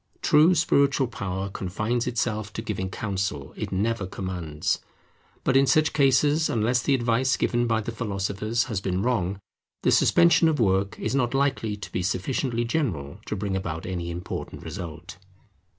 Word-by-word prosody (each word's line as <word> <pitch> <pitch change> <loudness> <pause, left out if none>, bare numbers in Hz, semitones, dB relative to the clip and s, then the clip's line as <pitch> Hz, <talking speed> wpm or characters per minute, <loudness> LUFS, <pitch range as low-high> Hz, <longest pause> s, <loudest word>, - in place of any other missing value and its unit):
True 155 +4 +5
spiritual 140 -3 +3
power 95 -5 -4
confines 105 +6 -2
itself 110 -3 -1
to 110 - -5
giving 95 -4 -3
counsel: 95 -9 -3
it - - -5
never 100 +1 0
commands. 90 -6 -3 0.6
But 130 - +1
in 135 0 +5
such 155 +1 +3
cases, 145 +3 +3
unless 120 +2 +1
the 140 - +2
advice 125 +2 +1
given 120 0 +1
by 110 -1 +1
the 115 - -4
philosophers 105 +1 -1
has 105 -6 -3
been 95 0 -1
wrong, 100 -6 0 0.4
the - - +3
suspension 170 -1 +5
of 155 -3 +1
work 100 -2 +1
is - - -2
not 130 -2 +1
likely 135 -6 0
to 105 - -8
be - - -1
sufficiently 115 +6 -1
general 100 - -2
to - - -2
bring 100 -1 -2
about 85 -4 -4
any 90 -2 -3
important 85 +1 -6
result. 85 +1 -7
110 Hz, 160 wpm, -25 LUFS, 95-130 Hz, 0.6 s, True